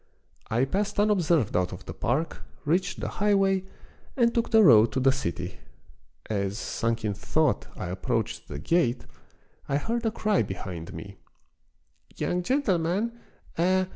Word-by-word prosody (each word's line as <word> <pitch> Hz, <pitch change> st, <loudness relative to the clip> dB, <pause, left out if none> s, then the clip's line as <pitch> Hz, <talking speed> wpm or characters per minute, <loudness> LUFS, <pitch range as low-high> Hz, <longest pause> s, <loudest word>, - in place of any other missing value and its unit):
I 120 Hz, +4 st, +2 dB
passed 205 Hz, +8 st, -1 dB
unobserved 175 Hz, -, +2 dB
out 90 Hz, 0 st, +1 dB
of -, -, -9 dB
the -, -, -6 dB
park, 150 Hz, +7 st, -1 dB, 0.2 s
reached 180 Hz, +5 st, 0 dB
the -, -, -2 dB
highway, 195 Hz, -2 st, +2 dB, 0.5 s
and 235 Hz, -2 st, +3 dB
took 235 Hz, -1 st, 0 dB
the 220 Hz, -1 st, +6 dB
road 115 Hz, -, +7 dB
to 130 Hz, -, +1 dB
the 135 Hz, +1 st, +4 dB
city. 90 Hz, -8 st, -4 dB, 0.7 s
As, 100 Hz, -1 st, -1 dB
sunk 115 Hz, -1 st, -2 dB
in 105 Hz, -, 0 dB
thought, 145 Hz, +8 st, 0 dB
I 90 Hz, -, -4 dB
approached 95 Hz, +1 st, -2 dB
the 75 Hz, -, -6 dB
gate 125 Hz, -, +1 dB, 0.6 s
I 140 Hz, -, +2 dB
heard 230 Hz, +10 st, -2 dB
a 225 Hz, -, +2 dB
cry 215 Hz, -2 st, +1 dB
behind 95 Hz, -3 st, -5 dB
me. 100 Hz, 0 st, -9 dB, 1.0 s
"Young 180 Hz, -, -1 dB
gentleman! 195 Hz, -, +1 dB, 0.5 s
eh! 185 Hz, +2 st, +3 dB
160 Hz, 145 wpm, -27 LUFS, -, 1.0 s, road